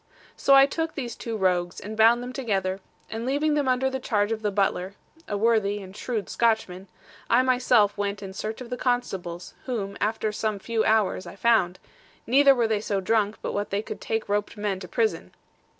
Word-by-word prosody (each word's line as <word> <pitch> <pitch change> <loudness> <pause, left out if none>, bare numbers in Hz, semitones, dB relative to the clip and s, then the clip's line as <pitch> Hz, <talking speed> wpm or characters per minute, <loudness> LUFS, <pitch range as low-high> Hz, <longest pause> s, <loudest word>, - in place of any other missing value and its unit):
So 275 - +4
I 275 0 +8
took 325 +3 -3
these 245 -5 -4
two 230 -2 -5
rogues, 180 -2 0
and 215 +2 -7
bound 230 +2 +5
them 250 +1 -6
together; 195 -7 -1 0.3
and 225 +1 -4
leaving 290 +4 +1
them 290 -2 +1
under 260 +1 +1
charge 210 -4 0
of 220 -1 -2
the 210 - 0
butler 195 -1 -1 0.3
(a 205 - -2
worthy 210 -2 +2
and 190 -1 -11
shrewd 220 -2 -3
Scotchman), 210 -5 0 0.4
I 245 +2 +5
myself 245 -5 +3
went 200 0 -2
in 190 -1 -7
search 215 +4 -5
of 250 -1 -9
the 250 - -2
constables, 195 -9 -2
whom, 200 -6 -3
after 215 +1 0
some 215 0 -2
few 225 +2 -1
hours, 210 -4 +1
I 170 - -9
found; 195 -5 +2 0.5
neither 275 +3 +6
were 235 -2 +2
they 215 -2 0
so 200 -2 -1
drunk 210 +1 +1
but - - -3
what 205 0 -2
they 200 +2 -1
could - - -7
take 225 -1 -2
roped 205 +2 -1
men 205 -2 -2
to 185 - -8
prison. 175 - -1
215 Hz, 195 wpm, -25 LUFS, 200-240 Hz, 0.5 s, I